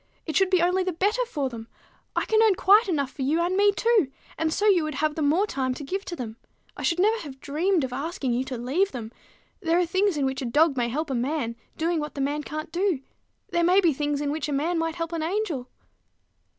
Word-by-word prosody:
It 315 - -4
should 385 -1 +4
be 370 -2 +3
only 365 +2 +2
the 370 - -1
better 415 +9 +1
for 290 - -2
them 230 -3 -8 0.5
all. - - +1
I - - -5
can 440 0 +3
earn 435 -3 +5
quite 405 +4 +5
enough 280 -6 0
for 280 - -8
you 295 +5 +1
and 350 +2 +1
me 405 +1 +5
too, 425 - +2 0.2
and 320 -1 0
so 410 +6 0
you 380 -6 +5
would 310 -2 -3
have 305 +2 0
the 315 - -4
more 310 +8 +3
time 260 -9 -2
to 290 - -7
give 385 +8 -4
to 345 - -5
them. 230 -6 -6 0.4
I - - -8
should 335 - +1
never 430 +4 +3
have 275 -7 -9
dreamed 320 +5 0
of 255 -1 -3
asking 275 -1 -2
you 245 +2 0
to 260 -2 -5
leave 290 +12 0
them. 230 -3 -6 0.5
There 335 -3 +1
are 360 - +3
things 375 0 +1
in 280 - +1
which 265 0 -2
a - - -3
dog 295 +5 +3
may 240 -2 0
help 300 +4 -2
a - - 0
man, 250 -1 -1 0.2
doing 330 +1 0
what 300 0 -5
the 280 - -3
man 290 +2 -1
can't 310 +2 -6
do: 355 -5 0 0.5
there 345 - +2
may 360 +3 +5
be 340 -5 +3
things 290 +1 -1
in 290 -1 -1
which 305 0 -3
a - - -1
man 325 +5 0
might 325 0 -1
help 330 -1 -4
an 330 - -2
angel." 325 - -2
315 Hz, 255 wpm, -25 LUFS, 275-370 Hz, 0.5 s, earn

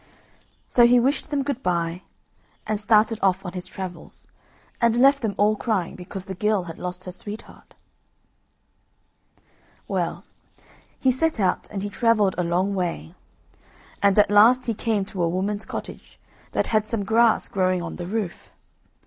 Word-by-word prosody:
So 240 -1 +5
he 245 +1 +5
wished 275 +5 0
them 285 -2 0
good 275 -2 -3
bye, 170 -2 -1 0.6
and 215 -1 -1
started 215 +1 +3
off 190 0 +1
on 180 - -5
his 180 -1 -5
travels, 185 -3 -8 0.6
and 235 -1 +3
left 275 +2 +5
them 215 -4 -2
all 210 +1 +3
crying 205 -5 -2
because 185 +1 -8
the 190 - -6
girl 210 0 0
had 165 -2 -9
lost 180 0 -6
her 185 - -7
sweetheart. 205 +4 -10 2.1
Well, - - -2 0.8
he 260 - +3
set 315 +2 0
out, 185 -3 +1
and 200 -2 -5
he 205 - -3
travelled 215 -3 +2
a - - +2
long 180 +4 0
way, 175 - -3 0.9
and 200 0 +3
at 205 -1 +5
last 230 +5 +6
he 230 - 0
came 215 -2 -1
to 190 -2 -5
a 170 - +2
woman's 200 +4 -2
cottage - - -8 0.3
that - - +1
had 215 -1 +2
some 215 -3 -2
grass 225 +1 +3
growing 185 -2 0
on 170 - -6
the 175 - -6
roof. 205 -3 -4
205 Hz, 160 wpm, -24 LUFS, 185-225 Hz, 2.1 s, last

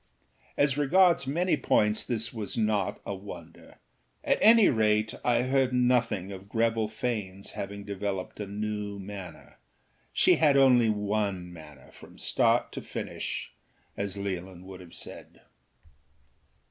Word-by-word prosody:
As 145 0 +2
regards 170 0 +4
many 175 +6 +1
points 105 -6 +1
this 115 -1 -2
was 110 -1 -4
not 105 -3 0
a - - -3
wonder; 95 -4 -11 0.5
at - - +1
any 225 -1 +7
rate 110 -1 +2
I 120 0 +2
heard 130 0 +1
nothing 120 -6 +1
of 95 +1 -10
Greville 115 -1 +1
Faneâs 105 -4 -4
having 100 +1 -6
developed 100 -1 -4
a 105 - -4
new 105 0 -4
manner. 95 -8 -10 0.5
She - - +4
had 145 -3 +4
only 125 -4 +5
one 100 -4 -1
manner 75 -5 -14
from - - -15
start - - +2
to - - -6
finish, - - -5 0.4
as 100 0 -4
Leolin 95 -2 -5
would 95 -1 -10
have 85 -2 -13
said. - - -9
105 Hz, 135 wpm, -28 LUFS, 95-125 Hz, 0.5 s, any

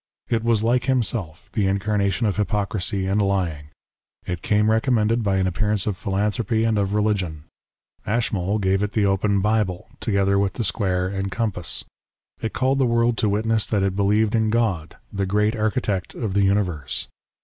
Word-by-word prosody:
It 115 -1 +1
was 115 -2 +2
like 120 +2 +2
himself, 110 - -2
the 105 -4 +1
incarnation 100 +2 0
of 105 -2 0
hypocrisy 100 -1 -1
and 100 +2 +1
lying. 90 -7 -1 0.6
It 90 -2 -4
came 105 +1 +2
recommended 115 -1 +2
by 100 -3 +1
an 95 - +1
appearance 105 +2 0
of 105 - -1
philanthropy 105 +4 0
and 110 -2 +2
of 100 0 0
religion. 95 -8 0 0.6
Ashmole 105 -3 0
gave 95 -1 +1
it 105 0 -2
the 105 -2 +2
open 100 0 +2
Bible, 105 -4 0
together 100 -2 +1
with 100 -1 0
the 120 - -3
square 90 -1 0
and 95 0 -3
compass. 100 -6 -3 0.6
It 110 - -2
called 135 +1 +1
the 130 - +3
world 115 0 +2
to 105 - +2
witness 110 +1 +1
that 105 -3 +1
it 95 -1 0
believed 105 +2 +2
in 110 -1 +2
God, 105 -9 0
" - - -29
the 100 -1 -1
great 105 +3 +1
Architect 105 -4 -1
of 110 -5 -3
the 100 0 +3
Universe." 90 -9 -1
105 Hz, 175 wpm, -23 LUFS, 95-110 Hz, 0.6 s, the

